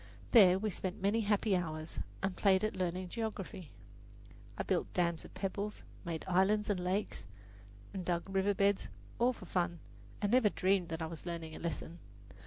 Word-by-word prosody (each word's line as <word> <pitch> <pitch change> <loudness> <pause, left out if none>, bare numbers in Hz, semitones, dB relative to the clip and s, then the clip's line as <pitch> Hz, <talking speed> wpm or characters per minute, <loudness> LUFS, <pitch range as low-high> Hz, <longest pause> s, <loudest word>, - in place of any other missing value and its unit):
There 190 -6 +8
we 215 +2 -1
spent 185 +1 -3
many 200 +4 +2
happy 205 -1 +2
hours 155 -3 -3 0.2
and 195 -1 0
played 190 -1 +4
at 215 - 0
learning 180 0 -2
geography. 205 -6 -4 0.9
I - - -1
built - - 0
dams 170 -2 +1
of - - -13
pebbles, 200 +2 -3 0.2
made 165 -3 -4
islands 200 +3 +3
and 195 - 0
lakes, 180 - -2 0.7
and 190 -2 -3
dug 175 0 -1
river 195 +1 +1
beds, 200 0 +2 0.3
all 245 +2 +4
for 215 - -10
fun, 175 -1 0 0.4
and 205 -1 0
never 245 -3 +5
dreamed 190 -2 +1
that 160 0 -3
I - - 0
was 165 +2 -7
learning 165 -2 -4
a - - -7
lesson. 170 0 -4
190 Hz, 175 wpm, -34 LUFS, 175-205 Hz, 0.9 s, There